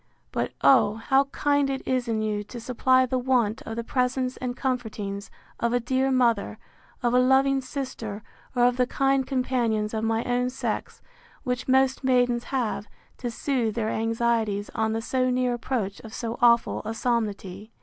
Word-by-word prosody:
But, - - -2
oh! 220 -6 +5
how 270 +5 +2
kind 285 0 +1
it 270 -1 -4
is 255 -2 0
in 220 -2 0
you, 210 -1 -1
to 240 +3 -8
supply 255 +2 +3
the 255 0 -1
want 245 -4 +1
of 225 - -4
the 235 - -3
presence 255 +1 0
and 250 -1 -4
comfortings 215 -6 -3 0.3
of 235 0 0
a 245 - +3
dear 260 +3 0
mother, 235 -5 +2 0.5
of 240 0 +2
a 250 - +5
loving 270 +1 +4
sister, 255 -6 -5 0.3
or 245 - +3
of 245 0 +2
the 250 -1 +2
kind 270 0 +1
companions 235 -5 0
of 220 0 -2
my 225 +1 +1
own 245 0 0
sex, 260 - -4 0.4
which 250 -2 -2
most 265 +1 +3
maidens 245 -2 +2
have, 230 -5 -2 0.3
to 245 - -3
soothe 235 -2 -1
their 220 -2 -1
anxieties 225 -2 0
on 220 0 0
the 225 0 -2
so 255 +1 +1
near 250 0 +1
approach 230 -4 -3
of 220 -1 -10
so 230 -1 -4
awful 235 -1 +4
a 220 +1 -4
solemnity! 215 -4 -2
245 Hz, 175 wpm, -26 LUFS, 225-260 Hz, 0.5 s, oh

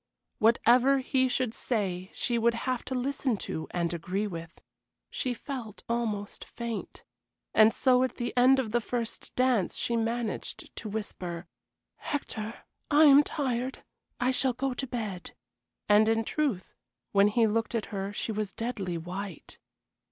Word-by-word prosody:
Whatever 240 +4 +5
he 260 0 +2
should 250 -2 0
say 190 -7 -2
she 235 -1 -1
would 235 +1 +3
have 255 +1 -2
to 260 - -3
listen 260 -2 0
to 160 -4 -4
and 170 -1 -1
agree 180 +5 -2
with. 165 -4 -7 0.5
She 250 -2 -2
felt 235 -6 -7
almost 220 -4 -2
faint. 235 -2 -6 0.5
And 220 0 +7
so 255 +1 +3
at 260 -2 0
the 240 - -3
end 255 +2 +6
of 245 -5 -1
the 240 +1 +2
first 235 0 -4
dance 250 -7 +2
she 235 - 0
managed 230 0 -3
to 215 - -5
whisper: 180 -5 -4 0.5
"Hector, 230 -6 -4 0.3
I 295 +1 +6
am 285 -1 +9
tired. 260 -4 -2 0.4
I 250 +1 +2
shall 260 0 +2
go 265 +2 -1
to 265 +2 -4
bed." 215 -7 -5 0.5
And 210 +1 +6
in 225 0 +2
truth 255 -8 -1 0.4
when 200 0 +5
he 225 +2 +3
looked 225 +2 0
at 225 - 0
her 195 0 -2
she 210 - -3
was 210 -2 -2
deadly 205 -7 -3
white. 180 +1 -7
230 Hz, 150 wpm, -29 LUFS, 205-255 Hz, 0.5 s, am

